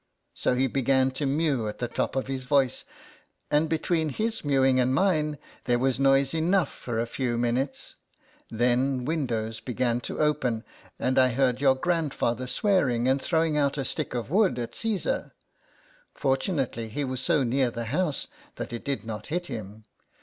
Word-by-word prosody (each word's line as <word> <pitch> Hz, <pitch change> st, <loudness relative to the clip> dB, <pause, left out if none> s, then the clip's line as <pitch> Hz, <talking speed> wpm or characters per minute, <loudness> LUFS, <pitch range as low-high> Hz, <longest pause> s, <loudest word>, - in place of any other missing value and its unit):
So 125 Hz, -, 0 dB
he 130 Hz, +2 st, +2 dB
began 130 Hz, 0 st, +2 dB
to 140 Hz, +2 st, -2 dB
mew 140 Hz, -5 st, +1 dB
at 105 Hz, -, -5 dB
the 120 Hz, -, -2 dB
top 120 Hz, -, -2 dB
of 135 Hz, -, 0 dB
his 135 Hz, -1 st, -4 dB
voice, 130 Hz, -1 st, +1 dB, 0.7 s
and 150 Hz, +2 st, +3 dB
between 160 Hz, 0 st, 0 dB
his 220 Hz, -, -2 dB
mewing 135 Hz, -2 st, +3 dB
and 130 Hz, +1 st, +2 dB
mine, 155 Hz, -5 st, +1 dB, 0.3 s
there 120 Hz, -1 st, +2 dB
was 130 Hz, +1 st, 0 dB
noise 135 Hz, 0 st, +4 dB
enough 165 Hz, +1 st, +1 dB
for 115 Hz, -2 st, -4 dB
a 115 Hz, -, +1 dB
few 120 Hz, 0 st, -2 dB
minutes; 120 Hz, +3 st, -2 dB, 0.5 s
then 125 Hz, +2 st, +1 dB
windows 115 Hz, -8 st, -2 dB
began 120 Hz, -1 st, -1 dB
to -, -, -6 dB
open, 130 Hz, -7 st, +1 dB, 0.3 s
and 130 Hz, +1 st, +1 dB
I 130 Hz, 0 st, +5 dB
heard 125 Hz, 0 st, +1 dB
your 135 Hz, -2 st, +5 dB
grandfather 135 Hz, -6 st, -1 dB
swearing 130 Hz, -, +1 dB
and 135 Hz, +1 st, +2 dB
throwing 160 Hz, -2 st, +1 dB
out 140 Hz, 0 st, +1 dB
a 135 Hz, -, -1 dB
stick 145 Hz, 0 st, -2 dB
of 120 Hz, +3 st, -4 dB
wood 195 Hz, -3 st, +3 dB
at 120 Hz, -1 st, -4 dB
Caesar; 220 Hz, -4 st, -1 dB, 0.8 s
fortunately 135 Hz, -, -1 dB
he 145 Hz, +7 st, -2 dB
was 130 Hz, -1 st, -3 dB
so 150 Hz, 0 st, +2 dB
near 130 Hz, +1 st, +2 dB
the 115 Hz, 0 st, -5 dB
house 150 Hz, +4 st, -1 dB, 0.3 s
that -, -, -6 dB
it 120 Hz, -, -5 dB
did 135 Hz, -7 st, -3 dB
not 110 Hz, -1 st, -6 dB
hit 175 Hz, +3 st, -2 dB
him. 110 Hz, -, -7 dB
135 Hz, 170 wpm, -27 LUFS, 120-150 Hz, 0.8 s, I